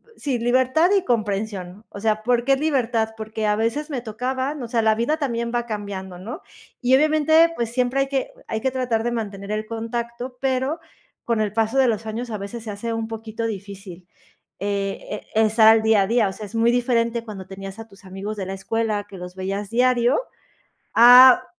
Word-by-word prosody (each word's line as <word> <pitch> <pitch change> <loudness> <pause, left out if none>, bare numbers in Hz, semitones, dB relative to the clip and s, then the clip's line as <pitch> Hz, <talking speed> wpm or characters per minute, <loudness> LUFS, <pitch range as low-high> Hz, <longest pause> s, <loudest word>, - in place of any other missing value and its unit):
sí, 270 - -2
libertad 260 +8 +3
y 385 - 0
comprensión, 205 -3 -2
o 200 - -9
sea, 215 0 0
¿por 240 0 +1
qué 275 +1 +4
libertad? 250 -6 0
Porque 220 0 -4
a 210 - +2
veces 230 +8 -1
me 275 -5 -2
tocaba, 260 +5 -3
o 240 - -5
sea, 230 -1 +1
la 220 -1 +3
vida 235 +8 0
también 235 -6 -2
va 240 0 0
cambiando, 200 -4 -6
¿no?, 235 - -7 0.4
y, 255 +1 +4
obviamente, 310 +3 +4
pues 235 -1 -2
siempre 250 +2 +1
hay 275 - 0
que 275 - -2 0.2
hay 220 - -3
que 265 - 0
tratar 250 -4 -1
de 240 - -1
mantener 205 -3 -5
el 215 0 -2
contacto, 235 +2 -5
pero 265 +4 0 0.5
con 230 -2 +1
el 210 -2 0
paso 225 +3 0
de 265 -2 +5
los 225 0 -2
años 230 +3 -4
a 215 - -3
veces 200 +4 -7
se 220 - -5
hace 230 +3 -4
un 225 0 -3
poquito 225 0 -5
difícil, 195 -4 -8 0.5
eh 200 0 -2
eh, 210 - -6
estar 220 0 +5
al 220 0 +7
día 220 -2 +4
a - - -2
día, 225 -2 +2
o - - -6
sea, 215 - -8
es 210 - -11
muy 230 +1 +3
diferente 235 -1 +1
cuando 195 -4 -8
tenías 195 +1 -9
a 225 - -8
tus 195 -1 -18
amigos 195 +3 -6
de 195 - -3
la 190 - -4
escuela 210 +1 -2
que 195 - -10
los 180 0 -9
veías 195 +2 -4
diario 245 +2 +3 0.8
a 250 +2 +9
225 Hz, 205 wpm, -22 LUFS, 210-245 Hz, 0.8 s, a